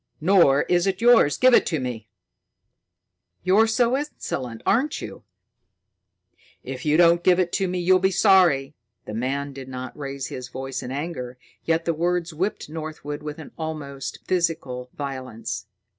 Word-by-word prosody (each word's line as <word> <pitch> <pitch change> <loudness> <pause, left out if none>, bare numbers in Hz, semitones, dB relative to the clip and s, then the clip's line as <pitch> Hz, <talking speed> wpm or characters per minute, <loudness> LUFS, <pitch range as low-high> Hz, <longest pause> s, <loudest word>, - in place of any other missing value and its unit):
"Nor 165 -5 +4
is 175 +1 +1
it 190 -1 0
yours. 235 -10 +5
Give 255 0 +5
it - - +6
to 160 - -1
me!" 120 -4 -5 1.3
"You're 200 +5 +4
insolent, 230 - -1
aren't 265 +9 +1
you?" - - -8 1.4
"If 130 +2 -6
you 150 +1 +4
don't 170 0 +5
give 185 -1 +4
it 180 -2 +1
to 195 -1 0
me, 180 0 -2
you 180 +1 +3
will 185 - +5
be 190 +1 +3
sorry." 180 -8 +4 0.3
The 105 - -7
man 135 +5 -2
did 135 -1 -9
not 130 -1 -7
raise 140 -2 -5
his 125 -1 -6
voice 130 +1 -5
in 125 - -6
anger, 135 -4 -5 0.3
yet 165 0 +1
the 170 - +1
words 170 +1 -1
whipped 185 +7 -2
Northwood 155 -1 -6
with 150 0 -7 0.2
almost 145 -4 -5
physical 160 -8 -1
violence. 130 -8 -5
155 Hz, 155 wpm, -24 LUFS, 135-180 Hz, 1.4 s, it